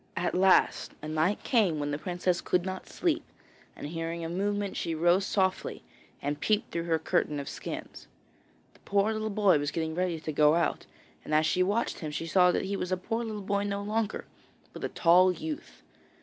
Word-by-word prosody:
At 175 - 0
last 185 +1 +3
a - - -4
night 160 +6 0
came 210 - +2
when 145 0 -2
the 145 - -2
princess 180 0 -1
could 180 0 0
not 185 0 -5
sleep, 330 -2 0 0.5
and - - -8
hearing 165 +2 -4
a - - -4
movement 200 +2 -1
she 165 - -2
rose 175 +4 +3
softly 190 -2 -1 0.4
and 145 +1 -2
peeped 210 +5 0
through 170 0 -2
her 165 -1 +2
curtain 150 -1 0
of 140 - -6
skins. - - -7 0.7
The - - -23
poor 200 +2 +1
little 215 0 -2
boy 200 -6 +3
was 145 0 -1
getting 160 0 -2
ready 175 -1 -1
to 155 - -4
go 150 +1 +4
out, 170 -3 0 0.4
and 155 - -1
as 155 +1 +4
she 180 +3 +1
watched 205 +5 0
him 155 - -4
she 150 +2 -4
saw 180 +2 +4
that - - -1
he 200 +1 -2
was 180 -1 -3
a 185 - +1
poor 225 +6 -3
little 215 -3 -5
boy 200 +1 0
no 200 0 -2
longer, 215 +1 -2 0.5
but - - -9
a - - -1
tall 180 +2 +5
youth. 315 - -7
180 Hz, 205 wpm, -29 LUFS, 160-200 Hz, 0.7 s, tall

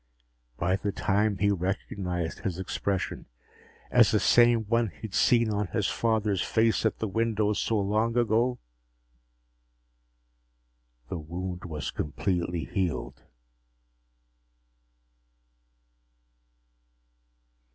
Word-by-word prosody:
By 95 +3 +1
the 100 +1 -2
time 105 +1 +1
he 100 +2 +2
recognized 90 -2 -3
his 90 -3 -3
expression 95 0 -3 0.6
as - - +6
the - - +2
same 120 -1 +5
one 115 +2 +1
he'd 95 +5 -10
seen 115 -2 +3
on 105 -1 -1
his 105 +1 -1
father's 110 -4 0
face 115 0 +2
at - - -3
the 110 - -2
window 105 0 +1
so 110 +2 0
long 110 +4 0
ago, 120 +2 +2 2.5
the 90 - -4
wound 90 +3 -6
was 75 -5 -4
completely 85 0 -2
healed. 75 -7 -3
100 Hz, 95 wpm, -28 LUFS, 90-110 Hz, 2.5 s, as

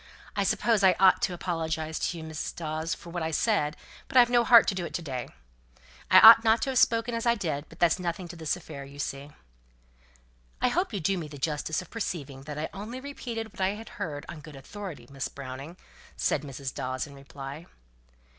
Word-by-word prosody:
I - - +1
suppose 225 -4 +2
I 185 -1 +6
ought 190 +2 +6
to 210 -7 0
apologize 160 -3 -3
to 175 - -2
you, 160 - -7
Mrs. 160 -1 -5
Dawes, 160 0 -3
for 170 - -12
what 175 0 -3
I 160 - -1
said; 160 -3 +1 0.3
but - - 0
I've 245 -1 +7
no 240 -1 +5
heart 235 -1 +7
to - - 0
do 185 -2 -3
it 170 - -5
to - - -2
day. 130 -5 -5 0.8
I - - +9
ought 225 +1 +11
not 225 0 +4
to 270 - 0
have 255 - +2
spoken 230 +1 +3
as 230 +1 -2
I 235 - +4
did; 155 -8 -3
but - - -14
that's 175 +1 +3
nothing 175 0 -3
to 175 - -8
this 160 -2 -1
affair, 145 -5 -9
you 140 +1 -12
see." 140 0 -4 1.3
"I 250 - +3
hope 355 +9 0
you 205 - -2
do 185 +3 0
me 160 - -5
the 145 -1 -10
justice 155 +2 -2
to 185 - -2
perceive 145 - -5
that 150 -1 -6
I 155 - -2
only 215 +6 -6
repeated 235 -5 -6
what - - -8
I 190 +2 +1
had 225 +2 -10
heard 145 -3 -4
on 170 -3 -8
good 150 0 -11
authority, 165 - -8
Miss 135 0 -3
Browning," 140 +5 -8 0.4
said 145 - +1
Mrs. 135 -2 -6
Dawes 130 0 -3
in 145 - -13
reply. 140 +3 -9
165 Hz, 220 wpm, -28 LUFS, 145-210 Hz, 1.3 s, ought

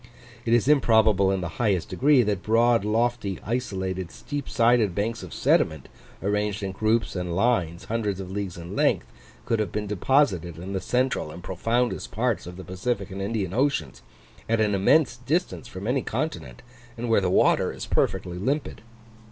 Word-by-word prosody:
It 115 - +2
is 120 +1 +2
improbable 110 -8 +4
in 95 -1 0
the 85 - -2
highest 100 -7 +1
degree 140 -2 +4
that 100 -3 -1
broad, 115 +2 +3
lofty, 110 -2 0
isolated, 95 -6 -2
steep 145 -2 -6
sided 115 -5 +3
banks 115 +3 -1
of 90 -3 -9
sediment, 80 -2 +1 0.3
arranged 105 0 -1
in 95 - -2
groups 110 +3 0
and 90 -2 -3
lines 90 -6 +1
hundreds 105 -4 -2
of 95 -1 -6
leagues 100 -3 -4
in 85 0 -7
length, - - +2 0.4
could 115 - 0
have 105 -5 -1
been 105 0 -2
deposited 100 - +1
in 95 +4 -6
the 95 - -2
central 125 -6 0
and 85 +3 -10
profoundest 115 +7 -1
parts 115 -3 -1
of 90 0 -8
the 95 - -8
Pacific 100 +3 -3
and 95 +1 -5
Indian 100 -3 -2
Oceans, 120 - 0 0.5
at 115 0 +2
an 105 -1 +2
immense 120 +6 +3
distance 135 +1 -2
from 95 -4 -8
any 125 +3 +1
continent, 80 - -4 0.3
and 120 +1 -3
where 115 -3 +3
the 95 - 0
water - - +3
is - - -7
perfectly 90 0 -1
limpid. 140 +9 -2
105 Hz, 175 wpm, -25 LUFS, 95-120 Hz, 0.5 s, improbable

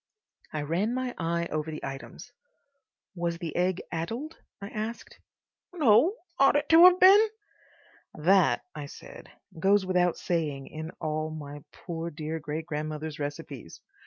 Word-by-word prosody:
I 150 -1 -3
ran 185 +10 0
my 255 -1 -2
eye 170 0 -1
over 155 +1 -2
the 155 - -6
items. 135 0 -8 0.8
"Was 170 -2 -2
the 165 -2 -6
egg 180 +1 0
addled?" 230 - -4 0.2
I 200 -1 -7
asked. 220 +2 -6 0.5
"No. 300 - +4 0.2
Ought 275 +1 +5
it 290 0 +1
to 330 +2 +9
have 365 0 +7
been?" 400 +4 +8 0.9
"That," 180 +3 +3
I 145 -2 -6
said, - - -12 0.3
"goes 195 +2 +3
without 180 -2 +2
saying 150 -6 -2
in 160 +1 -6
all 155 0 -2
my 145 -2 -8
poor 170 -2 -6
dear 155 0 -5
great 155 +1 -5
grandmother's 155 -1 -4
recipes. 145 - -6
170 Hz, 140 wpm, -28 LUFS, 155-215 Hz, 0.9 s, to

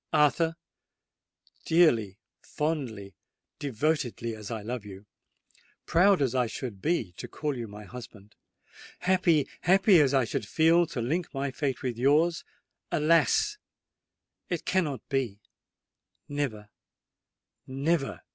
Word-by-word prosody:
"Arthur—dearly, 155 - 0 0.2
fondly, 125 - -3 0.5
devotedly 135 -3 -1
as 105 -2 -9
I 110 -3 -4
love 120 0 -4
you,—proud 140 - -2
as 130 -3 0
I 125 -2 +1
should 110 -2 -6
be 155 - 0
to - - -6
call 150 -2 -3
you 120 -2 -5
my 105 +1 -10
husband,—happy, 130 - -3
happy 190 -1 +5
as 140 -1 +2
I 130 -2 +3
should 105 -1 -3
feel 165 +5 +4
to 120 - -4
link 160 +9 -2
my 135 0 -2
fate 135 -2 -3
with 120 -3 -3
yours,—alas! 165 - +1 0.9
it 175 - -3
cannot 160 -8 -1
be:—never—never!" 130 0 -6
140 Hz, 100 wpm, -28 LUFS, 115-165 Hz, 0.9 s, happy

